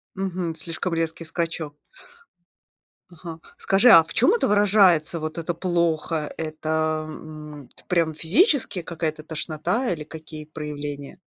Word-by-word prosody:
Мгм, 185 -3 -3
слишком 165 +2 -4
резкий 165 0 -2
скачок. 165 -2 -3 1.3
Ага. 165 -1 -10 0.2
Скажи, 195 +6 +4
а 165 - +10
в 165 - -10
чём 255 - +4
это 470 - +1
выражается, 195 -6 +4
вот 155 +1 -5
это 170 +1 -2
"плохо"? 165 -3 -1
Это, 155 0 -2
м, 150 -3 -10
т - - -14
прям 165 -3 +1
физически 195 - +3
какая-то 160 -2 -4
тошнота 160 - -2
или 155 -3 -6
какие 155 0 -10
проявления? 145 -1 -7
160 Hz, 125 wpm, -24 LUFS, 155-175 Hz, 1.3 s, а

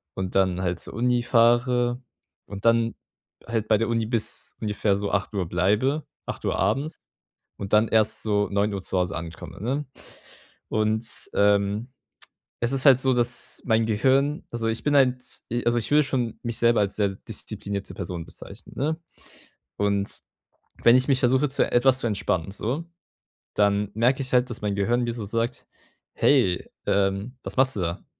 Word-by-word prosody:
und 95 -1 -4
dann 95 -1 +2
halt 90 -1 -1
zur - - -6
Uni 125 +1 +1
fahre 120 +1 +3 0.4
und 100 +1 -8
dann 115 0 +3 0.5
halt 115 -2 -2
bei 110 - +4
der 115 +1 -1
Uni 115 -1 0
bis 115 0 -2
ungefähr 105 -2 0
so 100 0 -3
8:00 100 -2 -1
bleibe, 105 - +1 0.2
8:00 - - -3
abends, 150 +4 -1 0.5
und 100 +1 -6
dann 110 +1 +5
erst 110 -1 +2
so 105 -1 +1
9:00 100 -1 0
zu 95 - -2
Hause 90 +2 -1
ankomme, 85 +2 -8
ne? 135 +6 -2 0.8
Und, 110 +1 0 0.3
ähm, 100 +3 +2 0.7
es 120 +2 +1
ist 135 0 -1
halt 130 -2 +7
so, 130 -1 +2
dass 120 0 +2
mein 110 -2 +2
Gehirn 135 +7 +1
also, 115 -1 -3
ich 115 0 -2
bin 145 - +2
ein 130 -2 +4
z 125 - -9 0.2
also, 120 0 +3
ich 115 -1 -2
würde 150 +1 +5
schon 125 -4 -2
mich 115 -2 -4
selber 115 -1 +4
als 100 -1 0
sehr 100 -2 +1
disziplinierte 100 +1 -6
Person 85 -3 -5
bezeichnen, 100 +5 -12
ne? 155 +4 -1 0.8
Und 100 -1 -1 0.6
wenn 120 +1 +7
ich 130 +2 +1
mich 130 - +3
versuche, 130 +3 +2
zu 135 - +1
etwas 130 +1 +4
zu 120 - -1
entspannen 95 -4 -1
so, 130 +11 -3 0.7
dann 100 0 +2
merke 125 +4 +2
ich 130 - -6
halt, 125 0 +3
dass 120 - -6
mein 105 -1 -1
Gehirn 120 +5 +1
mir 120 -1 -2
so 110 - -5
sagt: 115 +4 -3 0.5
„Hey, 120 -11 +2 0.2
ähm, 100 +5 0
was - - -7
machst 130 0 +3
du - - -1
da? 85 0 -3
115 Hz, 170 wpm, -25 LUFS, 100-125 Hz, 0.8 s, halt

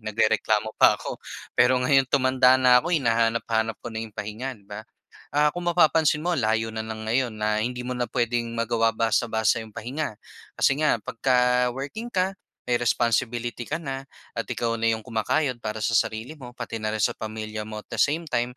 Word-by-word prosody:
Nagrereklamo 110 0 +1
pa - - +7
ako - - -7 0.3
pero 125 +1 +4
ngayon 130 +1 +3
tumanda 130 -1 +4
na 125 -1 +6
ako 170 - -5
hinahanap-hanap 115 -3 +1
ko 120 - -5
na 110 - -4
'yong 110 -2 -8
pahinga 110 +5 -5
'di 100 - -23
ba. 105 +1 -8 0.5
Ah, 150 +1 +2
kung 175 0 -3
mapapansin 160 -3 +3
mo 180 - +1
layo 115 -6 0
na 110 - -4
lang 110 0 -6
ngayon 115 +1 0
na 105 0 0
hindi 125 +2 -3
mo 125 - -3
na 125 -2 -2
puwedeng 120 -1 0
magawa 115 0 +1
basta-basta 115 0 +1
'yong 110 -1 -11
pahinga. 125 0 -4 0.4
Kasi - - +4
nga 155 - +3
pagka-working 125 - 0
ka, 190 -4 0 0.3
may 120 -1 +1
responsibility 120 0 0
ka 160 - -1
na 135 -2 -5 0.3
at - - -2
ikaw 115 -1 -1
na 115 - +2
'yong 110 -1 -1
kumakayod 125 +3 -1
para 110 0 -4
sa 115 - +1
sarili 110 +6 -1
mo 125 -3 -10
pati 115 -1 -5
na 110 - -2
rin 110 - -1
sa - - +3
pamilya 110 0 -5
mo 110 -1 -6
at - - -68
the - - -1
same 155 +4 +2
time 125 -1 -1
120 Hz, 190 wpm, -25 LUFS, 110-130 Hz, 0.5 s, pa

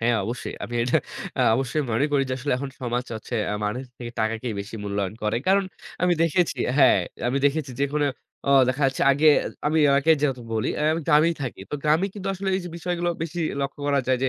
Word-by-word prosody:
হ্যাঁ, 120 +1 +2
অবশ্যই। 120 +2 -4
আমি 120 - -7
এটা 120 - +2 0.4
আ - - +3 0.2
অবশ্যই 135 +3 -1
মনে 135 +7 +2
করি 140 - +3
যে, - - -2
আসলে 140 +3 -1
এখন 135 +1 -5
সমাজ 125 0 -2
হচ্ছে 110 +2 -5
অ্যা 105 - -1
মানুষ 125 +5 -3 0.2
থেকে 120 -1 -6
টাকাকেই 110 +1 -1
বেশি 100 +3 -8
মূল্যায়ন 100 0 -2
করে। 105 +1 0
কারণ 195 0 +4 0.4
আমি 180 -1 +4
দেখেছি 165 -3 +1 0.2
হ্যাঁ, 130 -7 +6 0.3
আমি 130 +3 +1
দেখেছি, 145 -1 -1
যে 140 - +4
কোন 150 - +1 0.5
ও - - +4 0.2
দেখা 135 +3 -1
যাচ্ছে, 135 - -1
আগে 155 +3 +4 0.4
আমি 155 +2 +2 0.2
আগে 160 +4 +4
যেহেতু 135 -4 0
বলি, 110 - 0
অ্যা 150 - -1
আমি 165 - -1
গ্রামেই 165 +2 +5
থাকি। 125 -6 -5
তো - - -2
গ্রামে 155 +6 +3
কিন্তু 195 -2 -5
আসলে 190 +1 -4
এই - - -2
যে 175 - -5
বিষয়গুলো 175 0 -1
বেশি 170 +1 -4 0.2
লক্ষ্য 140 +1 -4
করা 140 -1 +2
যায়, 130 -1 +2
যে 135 - +3
135 Hz, 220 wpm, -24 LUFS, 120-160 Hz, 0.5 s, হ্যাঁ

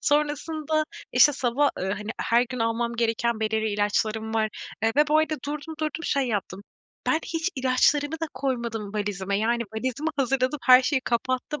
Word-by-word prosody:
Sonrasında 300 +1 0 0.3
işte 295 -1 +6
sabah, 265 +2 +1
eee, - - -2
hani 210 +2 -6
her 235 +1 +3
gün 255 - -5
almam 230 +1 0
gereken 230 0 0
belirli 220 0 0
ilaçlarım 215 +2 0
var, 220 -1 +2 0.3
eee, 225 0 +2
ve 295 0 +5
bu 310 +1 +4
arada 315 0 +1
durdum 300 +2 -5
durdum 310 +2 -3
şey 275 -2 +1
yaptım, 200 -2 -3 0.4
"Ben 315 - +3
hiç 330 +2 -1
ilaçlarımı 270 +3 +2
da 325 - -1
koymadım 235 -6 -3
valizime." 200 -1 -1
Yani 235 +2 +1
valizimi 260 +7 -2
hazırladım 270 +1 +1
her 255 0 +8
şeyi 275 0 +1
kapattım, 255 +4 -2
255 Hz, 165 wpm, -25 LUFS, 220-295 Hz, 0.4 s, her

